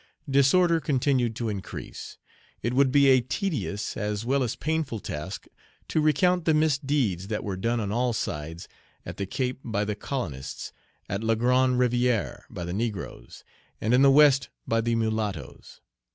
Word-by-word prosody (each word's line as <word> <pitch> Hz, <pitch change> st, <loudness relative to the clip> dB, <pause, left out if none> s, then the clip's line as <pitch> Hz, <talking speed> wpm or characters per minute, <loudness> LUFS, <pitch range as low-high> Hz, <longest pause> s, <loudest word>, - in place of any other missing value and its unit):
Disorder 165 Hz, +5 st, +4 dB
continued 130 Hz, -5 st, +1 dB
to 115 Hz, 0 st, -3 dB
increase. 100 Hz, -2 st, -7 dB, 0.5 s
It 120 Hz, +3 st, 0 dB
would 135 Hz, 0 st, +4 dB
be 140 Hz, +1 st, +5 dB
a 130 Hz, -1 st, +6 dB
tedious 130 Hz, -, -3 dB
as 105 Hz, 0 st, -3 dB
well 135 Hz, +3 st, +1 dB
as 120 Hz, -3 st, -1 dB
painful 155 Hz, -6 st, -2 dB
task 90 Hz, +2 st, -6 dB, 0.4 s
to 155 Hz, -, +1 dB
recount 165 Hz, +4 st, +2 dB
the 160 Hz, -, +4 dB
misdeeds 135 Hz, -, +1 dB
that 110 Hz, 0 st, -3 dB
were 100 Hz, -2 st, -3 dB
done 115 Hz, +5 st, -1 dB
on 100 Hz, -2 st, -2 dB
all 120 Hz, +2 st, +1 dB
sides, 80 Hz, -5 st, -4 dB, 0.4 s
at -, -, -7 dB
the 100 Hz, -, -3 dB
Cape 125 Hz, +4 st, -2 dB
by 105 Hz, -2 st, -1 dB
the 105 Hz, -, -1 dB
colonists, 85 Hz, -, -5 dB, 0.3 s
at 100 Hz, +3 st, -3 dB
La 115 Hz, 0 st, +2 dB
Grande 125 Hz, +2 st, +3 dB
Rivière 125 Hz, -2 st, +1 dB
by 90 Hz, -, -6 dB
the 85 Hz, -, -4 dB
negroes, 110 Hz, -1 st, -5 dB, 0.4 s
and 110 Hz, +3 st, 0 dB
in 125 Hz, -, +5 dB
the 140 Hz, -, +7 dB
West 140 Hz, -1 st, +5 dB, 0.2 s
by 115 Hz, 0 st, +2 dB
the 115 Hz, 0 st, 0 dB
mulattoes. 105 Hz, -11 st, -3 dB
120 Hz, 165 wpm, -26 LUFS, 105-140 Hz, 0.5 s, the